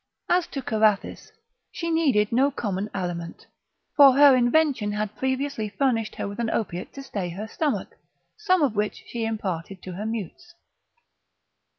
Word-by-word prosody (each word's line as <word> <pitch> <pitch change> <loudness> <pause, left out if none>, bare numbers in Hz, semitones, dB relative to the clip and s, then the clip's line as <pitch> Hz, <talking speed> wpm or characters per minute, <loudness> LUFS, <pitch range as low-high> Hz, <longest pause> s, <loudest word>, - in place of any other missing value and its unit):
As 355 -1 +2
to 275 - -6
Carathis, 215 -3 0 0.4
she 335 0 -3
needed 275 -11 +2
no 260 +4 +3
common 205 -6 -3
aliment, 175 -3 -5 0.5
for 280 -2 +8
her 280 0 +7
invention 250 -4 +2
had 210 0 -3
previously 265 -4 -2
furnished 230 -2 0
her - - -4
with 200 +3 -7
an 235 -1 0
opiate 180 -6 -3
to 275 - -8
stay 200 -9 -4
her 200 +6 -6
stomach, 295 +5 -2 0.5
some 370 -6 +2
of 255 -6 +1
which 210 0 -2
she 230 -1 -4
imparted 195 -4 -4
to 185 - -7
her 200 +5 -5
mutes. 230 - -6
225 Hz, 155 wpm, -25 LUFS, 205-275 Hz, 0.5 s, for